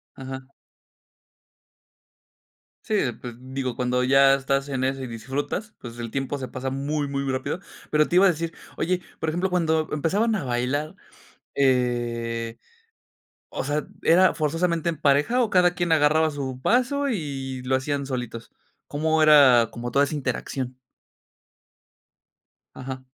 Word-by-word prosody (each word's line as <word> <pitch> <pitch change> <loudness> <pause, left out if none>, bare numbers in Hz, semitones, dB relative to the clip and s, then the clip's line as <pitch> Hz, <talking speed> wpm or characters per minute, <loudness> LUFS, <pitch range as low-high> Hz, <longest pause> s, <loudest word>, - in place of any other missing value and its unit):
Ajá. 130 0 -8 2.3
Sí, 220 - -1
de 135 - +1
pues, 120 0 -9
digo, 130 0 -4
cuando 125 0 0
ya 135 +1 +6
estás 135 +1 -1
en 130 -2 -2
eso 135 0 -1
y - - -4
disfrutas, 135 - -4
pues, 120 -1 -9
el 115 -1 -5
tiempo 135 +2 -2
se 130 -2 -5
pasa 130 +1 -4
muy, 145 +2 -2
muy 140 0 -2
rápido. 130 +6 -2 0.3
Pero 155 0 +3
te - - -2
iba 185 +2 +7
a - - +7
decir, 165 0 -2 0.2
oye, 180 +1 0 0.2
por 160 - -1
ejemplo, 175 +4 -1
cuando 160 -3 +1
empezaban 200 +10 +1
a 195 - -2
bailar, 130 +5 -1 0.6
eh, 120 -3 0 0.9
o - - -4
sea, 145 +2 -1 0.2
¿era 185 +3 +5
forzosamente 165 +2 0
en 160 -3 -3
pareja 150 - +3
o 225 - 0
cada 180 -2 +4
quien 175 -2 0
agarraba 155 +1 +4
su 135 -3 -5
paso 255 - +1
y 135 - -4
lo 130 +1 +1
hacían 140 +1 -2
solitos? 120 -3 -5 0.4
¿Cómo 155 +2 +1
era 135 -7 +7
como 120 +1 -5
toda 140 +3 +4
esa 150 - -4
interacción? 130 -2 -3 2.0
Ajá. 130 0 -7
140 Hz, 145 wpm, -24 LUFS, 130-160 Hz, 2.3 s, iba